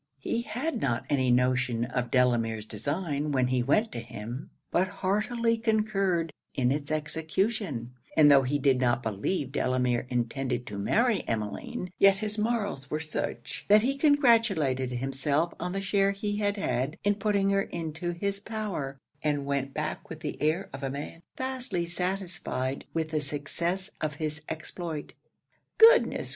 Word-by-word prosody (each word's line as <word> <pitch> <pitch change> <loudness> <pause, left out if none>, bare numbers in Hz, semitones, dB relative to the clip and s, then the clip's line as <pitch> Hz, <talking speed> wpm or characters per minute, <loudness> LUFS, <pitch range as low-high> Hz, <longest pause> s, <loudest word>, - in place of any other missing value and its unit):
He 185 - -2
had 245 +3 -3
not 115 - 0
any 130 -3 +2
notion 125 -1 +2
of 125 -1 -2
Delamere's 115 -4 +2
design 145 - -1
when 130 -2 +2
he 130 -1 +2
went 210 - +2
to - - -4
him, 120 +3 -7 0.2
but 185 +2 +2
heartily 215 +5 0
concurred 195 -7 +1 0.2
in 125 -2 +2
its 145 0 -2
execution; 155 - -1 0.2
and 150 -2 +8
tho' 140 -1 +8
he 135 +2 0
did 135 -2 +2
not 125 0 +2
believe 120 - -2
Delamere 125 -2 +1
intended 125 +1 -1
to 100 -3 -6
marry 230 - +2
Emmeline, 110 - -3
yet 195 0 +6
his 210 +1 0
morals 210 - -1
were 155 - -1
such, 155 -1 -4
that 210 +1 +6
he 270 +3 +1
congratulated 230 - +3
himself 135 +6 0
on 180 +1 -3
the 195 - -2
share 195 0 +2
he 205 0 -2
had 205 0 0
had 130 -4 -1
in 205 - +3
putting 200 -1 +1
her 195 0 +3
into 165 -1 -4
his 195 +3 -2
power, 200 -11 -4 0.2
and 145 -2 0
went 140 -1 -1
back 155 +2 -4
with 160 -1 -8
the - - -5
air 160 +6 +1
of 135 - -6
a 135 - -2
man 145 +4 -6 0.2
vastly 255 -9 -2
satisfied 175 -7 -2
with 160 -1 -1
the 155 -1 0
success 170 +7 -2
of 150 -1 -1
his 150 -1 -3
exploit. 160 -1 -5 0.6
'Goodness! 460 +2 +6
155 Hz, 155 wpm, -28 LUFS, 130-200 Hz, 0.6 s, and